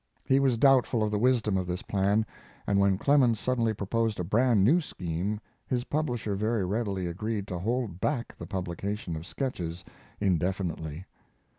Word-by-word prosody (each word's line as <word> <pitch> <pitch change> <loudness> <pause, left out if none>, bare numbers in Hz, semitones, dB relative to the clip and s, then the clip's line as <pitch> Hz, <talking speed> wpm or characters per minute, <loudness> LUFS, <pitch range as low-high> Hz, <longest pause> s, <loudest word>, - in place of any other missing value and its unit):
He 135 - +4
was 135 -4 +2
doubtful 125 -3 +4
of 105 - 0
the 105 - 0
wisdom 115 -4 +2
of 90 -1 -2
this 90 +1 -3
plan, 100 +2 +1 0.4
and 100 -1 +2
when 100 -1 +3
Clemens 125 -3 +3
suddenly 120 -2 +1
proposed 110 +1 -1
a - - 0
brand 110 +3 +3
new 160 - +5
scheme 90 - -3 0.3
his 125 -2 0
publisher 125 -8 -1
very 110 0 0
readily 100 -2 -1
agreed 100 +4 -3
to 90 - -3
hold 110 -2 -2
back 130 -5 -1
the 85 - -8
publication 95 0 -3
of 80 +3 -7
Sketches 90 - -4 0.3
indefinitely. 90 -3 -1
105 Hz, 160 wpm, -28 LUFS, 95-120 Hz, 0.4 s, new